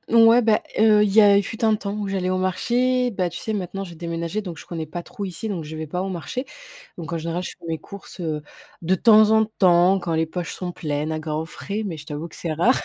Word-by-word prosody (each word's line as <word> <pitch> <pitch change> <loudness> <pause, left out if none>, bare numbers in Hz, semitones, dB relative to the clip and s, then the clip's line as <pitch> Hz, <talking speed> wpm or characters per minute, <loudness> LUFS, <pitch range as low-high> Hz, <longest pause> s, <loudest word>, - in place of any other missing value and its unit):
ouais, 230 +1 +6
bah, 220 -1 +3 0.2
heu, 215 -1 +6
il 205 - +1
y 220 - +7
a 200 -1 +6
fut 225 +4 -4
un 220 -1 +4
temps 200 -1 -4
où 210 -1 -3
j'allais 190 -2 -1
au 185 - 0
marché, 245 +7 +1
bah, 185 -3 0
tu - - -6
sais? 220 - -3
Maintenant, 195 0 -4
j'ai 175 - -10
déménagé, 170 +4 -3
donc, 175 -5 -7
je - - -11
connais 165 -2 -5
pas 175 +3 -6
trop 200 - -7
ici, 195 +4 -5
donc, 175 -6 -3
je 155 +1 -7
vais 155 0 -5
pas 180 +5 -3
au 195 - -3
marché, 190 +8 -4 0.5
donc, 165 -1 -7
en - - 0
général, 170 +2 -3
je - - -5
fais - - -15
mes 160 -1 -2
courses, 200 -1 -12
heu, 155 -3 -2 0.4
de 180 +3 +2
temps 215 +2 +6
en 220 0 +5
temps, 185 -2 +4
quand 170 -2 -3
les 160 0 +2
poches 175 +1 -4
sont 180 -1 -5
pleines 150 -2 -3
à 155 - -2
Grand 155 0 -3
Frais 205 +6 -5
mais 170 -5 -4
je 150 - -10
t'avoue 150 +2 -5
que 165 - -14
c'est 165 -2 -3
rare, 175 - +3
185 Hz, 265 wpm, -23 LUFS, 165-210 Hz, 0.5 s, y